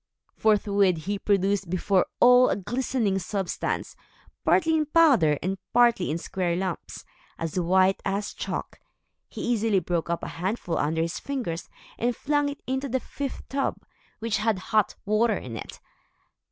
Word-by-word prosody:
Forthwith 200 -5 +2
he 200 +1 -2
produced 200 -2 +1
before 185 +1 +1
all 250 +1 +7
a - - +1
glistening 230 -1 -1
substance, 190 0 -3 0.5
partly 320 0 +3
in 305 -2 +1
powder, 270 - +5
and 190 +1 -2
partly 235 -6 +4
in 155 - -1
square 175 0 -2
lumps, 185 -1 -4 0.3
as 165 +2 -2
white 185 +2 +3
as 200 +1 -2
chalk. - - -5 0.5
He - - -7
easily 225 -3 +1
broke 170 -2 -2
up 170 - -2
a - - -3
handful 185 -2 -1
under 160 +2 +1
his 165 +1 -3
fingers, 245 -12 -4 0.3
and 240 +1 0
flung 290 +2 0
it 285 - -8
into 265 +2 -2
the 260 +2 0
fifth 275 +1 -6
tub, 275 0 -1 0.4
which 225 -2 -1
had 215 -1 +1 0.2
hot 215 -2 +3
water 215 +1 +2
in 120 -3 -7
it. - - -8
205 Hz, 155 wpm, -26 LUFS, 180-245 Hz, 0.5 s, all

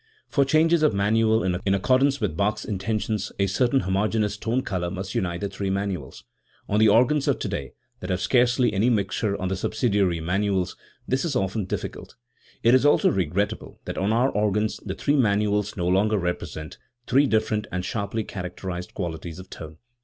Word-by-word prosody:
For 140 -2 +2
changes 160 +3 +3
of 155 -9 +3
manual 110 +2 +2
in 95 +2 0
accordance 130 +7 +2
with 100 -9 -1
Bach's 105 +4 0
in 100 -4 -3
tentions 105 0 -2
a 100 - +2
certain 120 +7 +2
homogeneous 105 +3 0
tone 115 +4 -1
colour 90 -3 -2
must 95 +1 -5
unite 85 -2 -2
the 100 - -1
three 100 0 -4
manuals. 95 -7 -3 0.4
On 105 - +1
the 110 0 +6
organs 125 +7 +3
of - - +2
today, - - -4 0.3
that 90 - -7
have 90 -1 0
scarcely 120 +2 +3
any 105 +5 +2
mixtures 100 -1 0
on 95 - -2
the 95 - -1
subsidiary 100 -4 0
manuals, 95 +2 0 0.3
this 130 +1 0
is 160 -5 -2
often 100 -2 -1
dif - - -3
ficult. - - -8 0.5
It 115 - +5
is 130 - +5
also 145 - +4
regrettable 95 +4 -2
that - - -4
on 100 +3 +1
our 125 +4 +2
organs 105 +1 0
the 95 -1 -4
three 145 +8 +1
manuals 105 -4 +1
no 90 -1 -1
longer 105 +4 +2
represent, 85 -4 -4 0.3
three 135 +4 +3
different 110 -2 0
and 90 0 -3
sharply 110 0 -2
characterised 90 -2 -6
qualities 85 -2 -5
of 95 0 -11
tone. 80 0 -9
100 Hz, 185 wpm, -25 LUFS, 95-115 Hz, 0.5 s, the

